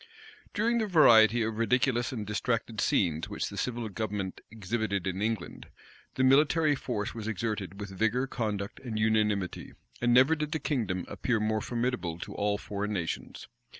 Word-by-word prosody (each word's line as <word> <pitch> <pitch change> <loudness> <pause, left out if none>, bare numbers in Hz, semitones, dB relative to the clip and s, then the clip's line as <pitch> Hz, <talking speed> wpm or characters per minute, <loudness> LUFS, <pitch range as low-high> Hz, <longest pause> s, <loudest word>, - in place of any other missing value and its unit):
During 235 +3 +2
the 220 - 0
variety 120 - +6
of 110 0 -3
ridiculous 120 +1 +1
and 110 -5 -4
distracted 110 +1 -2
scenes 80 -4 +1
which - - -3
the - - -9
civil 120 -2 -2
government 105 -2 -4
exhibited 110 -2 -2
in 95 +1 -2
England, 110 -4 -3 0.5
the 130 - +1
military 150 +3 +4
force 120 -5 -3
was 110 -2 -6
exerted 105 -3 -3
with 100 -1 -6
vigor, 110 +6 +1
conduct, 105 -6 -3
and 115 -4 -5
unanimity; 105 -3 0 0.3
and 120 0 +3
never 130 +6 +6
did 150 0 -3
the 160 - -1
kingdom 115 - -1
appear 120 -3 -1
more 110 0 0
formidable 120 -9 -2
to - - -7
all 105 0 0
foreign 105 +1 -4
nations. 85 -5 -4
110 Hz, 160 wpm, -29 LUFS, 100-125 Hz, 0.5 s, variety